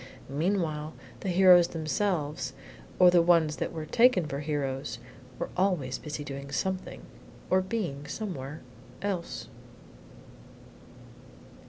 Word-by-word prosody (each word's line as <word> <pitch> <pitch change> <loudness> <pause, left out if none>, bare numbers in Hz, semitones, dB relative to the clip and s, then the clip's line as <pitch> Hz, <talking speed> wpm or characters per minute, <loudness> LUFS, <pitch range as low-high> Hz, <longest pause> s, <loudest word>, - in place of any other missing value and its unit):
Meanwhile 155 0 -1 0.2
the 195 - -3
heroes 180 -1 +7
themselves 160 -2 -1 0.4
or 180 -1 +7
the 175 -1 +6
ones 165 -3 +3
that - - -2
were 160 -2 -5
taken 230 -2 +4
for 140 -2 -4
heroes 140 -3 -2 0.4
were - - -4
always 175 -9 0
busy 150 -1 -5
doing 140 -1 -7
something, 185 +5 -3 0.5
or 185 0 +5
being 185 -9 -3
somewhere, 150 -7 -5 0.4
else." 190 -4 -3
165 Hz, 110 wpm, -29 LUFS, 145-185 Hz, 0.5 s, heroes